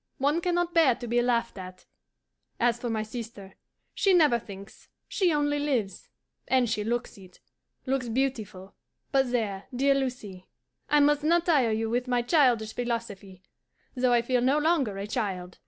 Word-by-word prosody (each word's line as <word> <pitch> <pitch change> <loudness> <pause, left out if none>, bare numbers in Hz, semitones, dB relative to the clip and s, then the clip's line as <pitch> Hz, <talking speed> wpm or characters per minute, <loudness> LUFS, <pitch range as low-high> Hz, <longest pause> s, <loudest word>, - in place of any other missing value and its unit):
One 290 +5 +1
can 355 0 0
not 350 0 -1
bear 315 -8 +4
to 240 - -8
be 240 +1 +1
laughed 235 -3 -1
at. 185 0 -10 0.7
And 240 - +4
as 235 0 -3
for 240 - -4
my 220 -1 -1
sister, 215 -4 -9 0.4
she 390 -2 +3
never 300 -9 +4
thinks; 200 -1 -13 0.2
she 370 -4 +1
only 290 -1 0
lives; 245 -10 -2 0.4
and 260 -2 +2
she 215 -2 -1
looks 235 -1 -3
it 185 -2 -16 0.5
looks 260 -2 -1
beautiful. 220 -7 -3 0.4
But 270 -3 +2
there, 205 -5 -2
dear 275 +2 +3
Lucie, 250 -9 -4 0.4
I 295 0 +4
must 295 0 +3
not 340 +2 +2
tire 285 -9 +3
you 220 +1 -1
with 245 +3 -1
my 245 -1 +1
childish 240 -6 +2
philosophy, 215 -6 -5 0.5
though 250 -1 +1
I 240 -1 +3
feel 250 0 +1
no 265 +4 +2
longer 295 - +1
a 200 - -4
child. 190 -5 -4
240 Hz, 170 wpm, -27 LUFS, 215-275 Hz, 0.7 s, bear